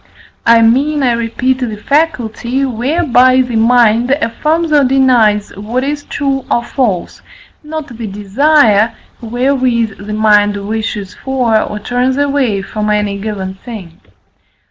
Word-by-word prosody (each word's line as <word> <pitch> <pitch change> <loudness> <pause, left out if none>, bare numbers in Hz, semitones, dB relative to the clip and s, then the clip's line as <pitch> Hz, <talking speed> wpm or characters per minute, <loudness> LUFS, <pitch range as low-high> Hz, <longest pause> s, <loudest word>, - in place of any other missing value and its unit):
I 230 0 +6
mean, 280 +6 +2
I 250 - +3
repeat, 235 +3 -1
the 230 -5 -4
faculty, 260 -2 -1
whereby 255 0 +2
the 250 -2 -3
mind 235 +1 +3
affirms 305 +5 0
or 295 -2 +4
denies 250 -6 +2
what 225 +6 -3
is 290 +1 -3
true 275 -2 -2
or 235 - +1
false, 235 -9 -2 0.4
not 310 0 -5
the 235 -4 -8
desire, 215 +2 +2 0.3
wherewith 240 -3 -1
the 210 - -4
mind 210 -1 +3
wishes 215 -2 -4
for 255 -4 -1
or 210 - -4
turns 250 +4 -1
away 275 -8 0
from 210 +1 -3
any 210 -1 -1
given 195 -3 -5
thing. 190 -5 -11
235 Hz, 130 wpm, -13 LUFS, 215-270 Hz, 0.4 s, I